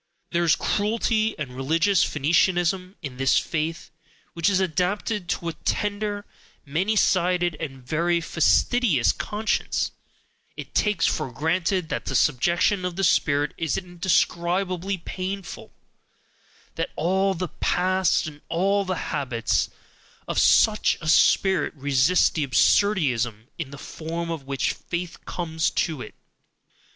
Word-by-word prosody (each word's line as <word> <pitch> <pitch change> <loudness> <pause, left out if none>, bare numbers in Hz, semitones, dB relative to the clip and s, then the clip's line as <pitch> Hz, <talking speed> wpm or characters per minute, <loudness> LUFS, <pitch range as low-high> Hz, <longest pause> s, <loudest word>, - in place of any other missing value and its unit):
There 170 0 +1
is 165 -3 +4
cruelty 220 +1 0
and 150 -4 -5
religious 165 +8 +2
Phoenicianism 175 +5 +1
in 130 -4 -6
this 135 0 +3
faith, 160 0 -2 0.4
which 170 +2 +1
is 195 -2 +2
adapted 190 +2 -1
to 170 - -2
a - - -5
tender, 205 +2 -2 0.4
many 180 +10 0
sided, 180 -3 +2
and 135 -5 -7
very 170 +5 +1
fastidious 165 - +2
conscience, 215 +1 -2 0.7
it - - -8
takes 210 -3 +1
for 150 -5 -1
granted 170 - 0
that - - -3
the - - -3
subjection 170 +7 +2
of 180 -1 -3
the 195 - -2
spirit 145 -4 +2
is 165 -4 -1
indescribably 180 +1 0
PAINFUL, 185 +2 -6 1.0
that - - -3
all 190 +4 +1
the 180 0 -3
past 185 0 +1
and 150 -1 -9
all 195 +4 +1
the 185 -1 -2 0.2
habits 120 -4 0 0.6
of - - 0
such 215 -1 +4
a 165 - -7
spirit 185 +2 +3
resist 140 +4 +3
the 155 - -1
absurdissimum, 130 - +2
in 155 -5 -4
the 140 - -10
form 165 +3 -5
of 150 -5 -6
which 135 -1 -1
"faith" 175 -1 -6
comes 160 -2 -1
to 155 -5 -2
it. 105 - -9
170 Hz, 130 wpm, -24 LUFS, 155-190 Hz, 1.0 s, is